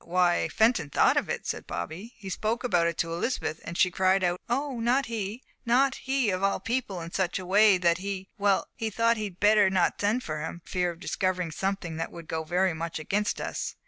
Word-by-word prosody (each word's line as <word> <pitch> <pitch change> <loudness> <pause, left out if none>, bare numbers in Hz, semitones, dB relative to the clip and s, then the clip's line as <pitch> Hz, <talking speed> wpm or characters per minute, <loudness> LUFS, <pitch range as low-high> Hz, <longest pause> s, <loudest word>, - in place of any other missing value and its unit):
"Why, 175 -1 +2
Fenton 220 - +2
thought - - +4
of - - 0
it," - - -3
said - - -4
Bobby. 170 - -6
"He 195 -4 -7
spoke 225 +6 -1
about 175 -9 +2
it 170 - -2
to 165 0 -1
Elizabeth, 170 -3 -2
and 170 - -6
she 180 - +4
cried 190 +1 +2
out 175 0 0
'Oh, 265 0 -1
not 250 +4 +2
he 225 +1 -4 0.2
not 260 +2 +3
he 265 -5 0
of 185 0 -2
all 195 0 +1
people' 225 -6 -2
in 165 0 -7
such 185 -1 0
a 185 - -6
way 200 +1 +5
that 175 -1 +2
he 195 0 -4
well, 200 -1 +2
he 225 -2 -2
thought 230 +2 +2
he'd 205 -4 -5
better 210 -1 +5
not 185 -2 +1
send 215 +5 +1
for 155 -1 -4
him, 165 +2 -6
for - - -14
fear 180 -1 +1
of 170 -1 -8
discovering 180 -2 -1
something 190 -2 -3
that 165 - -3
would 170 -2 -10
go 160 0 -2
very 180 +3 +1
much 165 +1 -4
against 205 +7 -1
us. - - -4
190 Hz, 225 wpm, -27 LUFS, 175-225 Hz, 0.2 s, way